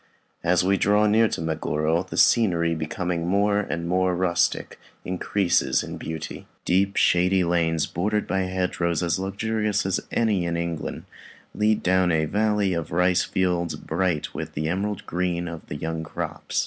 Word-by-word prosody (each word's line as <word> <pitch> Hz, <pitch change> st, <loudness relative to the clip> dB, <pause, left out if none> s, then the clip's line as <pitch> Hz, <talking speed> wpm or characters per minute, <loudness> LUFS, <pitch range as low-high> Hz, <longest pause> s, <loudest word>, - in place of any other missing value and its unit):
As 90 Hz, +1 st, +3 dB
we 95 Hz, +1 st, +2 dB
draw 105 Hz, +2 st, +3 dB
near 110 Hz, +2 st, +4 dB
to -, -, -4 dB
Meguro, 80 Hz, 0 st, 0 dB
the -, -, -7 dB
scenery, 85 Hz, -8 st, +3 dB
becoming 85 Hz, +2 st, -3 dB
more 100 Hz, +2 st, +2 dB
and 85 Hz, -4 st, -3 dB
more 90 Hz, +1 st, +1 dB
rustic, 90 Hz, -1 st, 0 dB, 0.3 s
increases 90 Hz, 0 st, +1 dB
in -, -, -7 dB
beauty. 80 Hz, -1 st, -6 dB, 0.2 s
Deep 95 Hz, +2 st, +2 dB
shady 90 Hz, +1 st, +3 dB
lanes, 85 Hz, -2 st, +1 dB
bordered 105 Hz, +5 st, -1 dB
by 95 Hz, -, -1 dB
hedgerows 90 Hz, -2 st, -1 dB
as 85 Hz, +1 st, 0 dB
luxurious 105 Hz, +1 st, -1 dB
as 95 Hz, 0 st, +1 dB
any 105 Hz, -6 st, +1 dB
in 85 Hz, -1 st, -1 dB
England, 85 Hz, -2 st, -4 dB, 0.5 s
lead 105 Hz, 0 st, +1 dB
down 95 Hz, 0 st, +3 dB
to 85 Hz, -, +2 dB
a 80 Hz, 0 st, +1 dB
valley 105 Hz, +1 st, +1 dB
of 85 Hz, -3 st, -3 dB
rice 90 Hz, +1 st, +3 dB
fields 90 Hz, -2 st, 0 dB
bright 85 Hz, -2 st, -2 dB
with -, -, -6 dB
the 75 Hz, +1 st, -1 dB
emerald 100 Hz, +4 st, -2 dB
green 90 Hz, -1 st, -2 dB
of 85 Hz, -1 st, -8 dB
the -, -, -5 dB
young 80 Hz, +2 st, -3 dB
crops. 80 Hz, -, -4 dB
90 Hz, 160 wpm, -24 LUFS, 85-100 Hz, 0.5 s, near